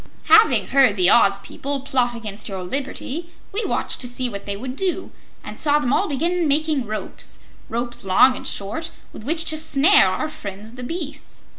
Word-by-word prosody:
"Having 440 +1 +5
heard 265 -6 +4
the 180 0 +4
Oz 200 -4 +5
people 275 +5 -5
plot 250 -3 0
against 215 -2 -5
your 190 -2 -5
liberty, 275 - -4 0.2
we 425 +4 -2
watched - - -1
to 250 - +3
see 250 +1 -2
what 200 -2 -8
they 200 0 -2
would 255 +4 -6
do, 375 +2 -3 0.3
and - - -9
saw 295 -1 +4
them 270 -3 0
all 395 - +1
begin 335 +4 0
making 295 -3 0
ropes 215 0 -5 0.3
ropes 240 +1 -1
long 195 +7 +4
and 265 +1 -7
short 215 +12 -3 0.2
with - - -10
which 325 +3 +1
to 315 -1 +3
snare 315 +5 +5
our - - -2
friends 215 -7 -8
the 250 - -9
beasts. 300 +2 -7
265 Hz, 185 wpm, -21 LUFS, 220-310 Hz, 0.3 s, Having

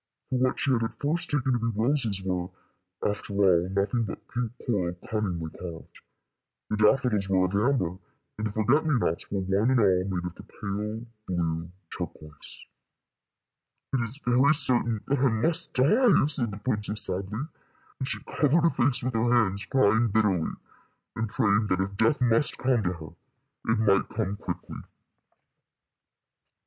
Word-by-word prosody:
For 130 - +1
what 130 0 +1
she 140 - +1
had 120 -3 +2
at 115 0 -4
first 155 +4 -1
taken 135 -3 0
to 120 - +1
be 115 -2 -2
roses 115 -6 +1
were, 90 -2 -2 0.6
after 105 0 -3
all, 90 -3 +3
nothing 100 +5 0
but 100 - -8
pink 120 -2 -3
coral 90 -7 -1
cunningly 90 -7 -2
carved, 85 -2 -10 0.7
the 105 - 0
daffodils 105 -2 +2
were 95 -1 +3
of 90 - -3
amber, 100 -5 +1 0.4
and 110 +2 -2
the - - -4
forget 110 +8 +2
me 150 -4 +1
nots 85 -7 -1
were 100 -1 -2
one 95 +5 +1
and 130 -1 +3
all 95 -4 +3
made 90 -3 -3
of 90 - -5
the - - -12
pale 105 +2 -5 0.2
blue 85 -1 -2 0.2
turquoise. 75 -2 -8 1.3
"It - - +3
is 120 +4 -4
very 130 +4 +4
certain 120 -5 +3
that 140 0 0
I 135 0 +4
must 160 +10 0
die," 200 - +4
said 135 -6 0
the 100 - -7
princess, 105 -1 +2
sadly, 100 +5 -1 0.6
and 130 - -3
she 110 -5 -3
covered 155 +2 +1
her 170 - +5
face 125 0 +1
with 130 +1 -2
her 115 +1 +1
hands, 100 -5 +2
crying 115 -2 +3
bitterly, 100 -6 +1 0.7
and 115 -1 -2
praying 105 +1 +2
that 90 -2 0
if 100 +1 -2
death 115 +6 +2
must 120 +4 +2
come 125 -2 +1
to 90 -2 -1
her, 80 -3 -9 0.6
it 115 - +2
might 100 -3 +2
come 105 -3 -2
quickly. - - -6
110 Hz, 165 wpm, -27 LUFS, 95-125 Hz, 1.3 s, her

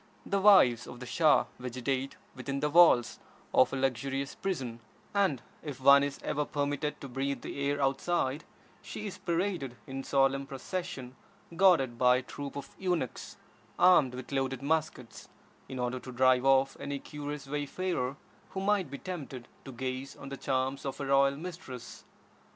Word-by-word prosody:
The 200 0 0
wives 155 - +6
of 120 - -9
the 125 - -7
Shah 155 +5 +4
vegetate 130 +2 -3 0.2
within 135 +1 -4
the 150 +1 0
walls 145 -8 +5 0.3
of 130 - +5
a - - -2
luxurious 135 +1 -1
prison; 130 -12 -4 0.3
and 185 - +1 0.2
if 145 -4 -7
one 140 +1 +7
is 140 -1 -2
ever 150 0 0
permitted 145 0 -2
to 140 - -6
breathe 135 +2 -2
the - - -6
air 145 0 -1
outside, 140 +1 0 0.4
she 210 - -7
is 200 - -6
paraded 170 -7 -1
in 135 0 -5
solemn 135 0 +2
procession, 135 -2 -5 0.4
guarded 165 -10 +4
by 125 0 +6
a - - -2
troup 140 +2 -7
of 140 -1 -8
eunuchs 180 -9 -2 0.4
armed 150 -9 +5
with 130 +2 -8
loaded 135 -1 -1
muskets, 155 -5 -2 0.4
in 130 - -6
order 125 +1 -2
to 130 - -9
drive 130 +1 +3
off 135 0 +4
any 140 0 -3
curious 145 0 -6
wayfarer 145 -1 -2 0.3
who 190 - -5
might 195 -4 +1
be 140 - -6
tempted 140 -9 -7 0.2
to 135 - -7
gaze 130 +2 -5
on 135 - -9
the 140 - -5
charms 135 0 -1
of 135 0 -5
a 140 - -3
royal 140 0 +3
mistress. 150 -8 -8
140 Hz, 160 wpm, -30 LUFS, 130-150 Hz, 0.4 s, one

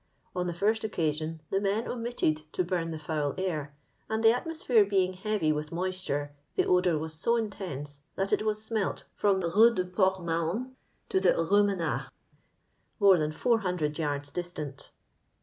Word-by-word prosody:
On 180 0 -1
the - - -1
first 215 +6 +1
occasion, 160 -5 -1
the 195 - +1
men 205 +3 0
omitted 160 -11 -1
to 185 - +1
bum 175 -2 -1
the 160 - -4
foul 150 -2 -2
air, 155 -6 -3 0.3
and 220 +1 -1
the 225 - +8
atmosphere 250 -4 +2
being 190 -2 +1
heavy 190 -4 0
with 150 0 -3
moisture, 175 -5 -2 0.2
the - - +2
odour 180 -2 +3
was 160 +1 -4
so 200 +9 +1
intense 160 - -4 0.2
that 195 0 0
it - - +3
was 215 0 0
smelt 220 -2 -2
from 195 -2 +2
the 170 -2 -1
Rue 230 +5 +6
du 185 -1 0
Port 185 0 +1
Mahon 170 +10 -2 0.3
to 190 - +2
the 190 -1 +4
Rue 200 +5 +4
Menars, 195 -5 -1 0.9
more 195 -4 +6
than 155 0 0
400 180 -6 0
yards 145 -2 -2
distant. 155 -5 -5
180 Hz, 165 wpm, -29 LUFS, 155-205 Hz, 0.9 s, the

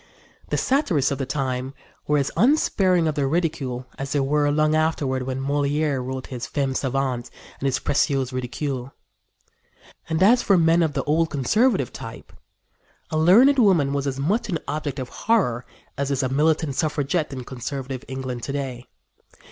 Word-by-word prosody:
The - - 0
satirists 185 - +1
of 140 - -2
the 135 - -2
time 130 -1 -2 0.3
were 150 - +3
as 140 -1 0
unsparing 190 - +3
of 155 - 0
their 145 -2 0
ridicule 150 -6 -1
as 135 0 -3
they 145 - +2
were 145 +2 +2
long 155 +1 +2
afterward 155 -4 0
when 130 0 -2
Molière 145 0 0
wrote 130 0 -5
his 125 -2 -6
Femmes 135 -2 -1
Savantes 130 -2 -2 0.3
and 135 - -1
his 135 - +1
Précieuses 135 -2 0
Ridicules. 130 +1 -3 1.2
And 160 +3 +1
as 240 +5 +6
for 195 - +3
men 165 0 +4
of 160 -3 +1
the - - -1
old 160 +2 +1
conservative 185 - +1
type, 115 -4 -9 0.8
a 155 - 0
learned 240 - +6
woman 170 - +4
was 140 0 -1
as 135 0 -3
much 200 - 0
an 170 - 0
object 150 -1 -3
of 130 -2 -5
horror 155 - 0 0.3
as 140 0 -1
is 140 -1 0
a 130 - 0
militant 150 +1 +1
suffragette 150 +1 -1
in 130 -2 -6
conservative 130 +1 -5
England 130 -2 -5
to 135 - -4
day. 130 -3 -4
140 Hz, 170 wpm, -23 LUFS, 130-160 Hz, 1.2 s, as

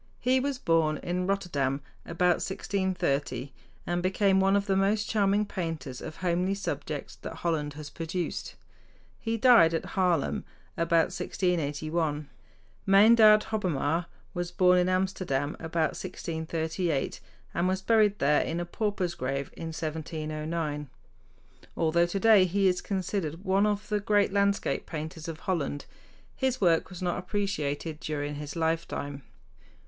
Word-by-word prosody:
He 255 +1 +3
was 275 0 -1
born 165 -7 +2
in 180 +1 -1
Rotterdam 145 -9 0 0.3
about 175 +1 +2
1630, 185 -8 -1 0.3
and 175 0 -1
became 190 +1 +3
one 195 +1 +4
of 200 0 +1
the 195 -2 +1
most 205 +2 +2
charming 205 -1 +2
painters 165 -9 -5
of 155 - -7
homely 180 +2 0
subjects 200 - -5
that - - -7
Holland 155 -4 -1
has 150 0 -8
produced. 170 +2 -4 0.6
He 225 0 -2
died 225 -9 +6
at - - -2
Haarlem 180 -6 +1 0.3
about 165 +1 +2
1681. 155 -4 -1 0.6
Meyndert 215 +2 +7
Hobbema 170 -5 0 0.3
was 175 -1 -3
born 180 0 +4
in 180 +1 +2
Amsterdam 185 -7 0
about 160 0 0
1638, 160 -3 -3 0.3
and 170 +2 +1
was 190 0 -1
buried 215 -2 +4
there 150 -2 +3
in 165 - -2
a 175 - -2
pauper's 190 -2 -2
grave 135 -2 -3
in 165 - -6
1709. 155 -1 -4 0.9
Although 170 +1 +3
today 195 +1 +5
he 195 +2 +2
is 180 -1 +1
considered 185 -3 -3
one 195 +2 +3
of 210 0 -1
the 210 -1 +1
great 205 -1 +2
landscape 200 0 +1
painters 160 +1 -6
of 160 -1 -6
Holland, 155 -7 -2 0.5
his 260 -2 0
work 170 -4 +3
was 185 -1 -8
not 175 0 0
appreciated 165 -6 -2
during 145 -2 -3
his 150 +1 -6
lifetime. 160 -4 -2
175 Hz, 135 wpm, -28 LUFS, 155-195 Hz, 0.9 s, Meyndert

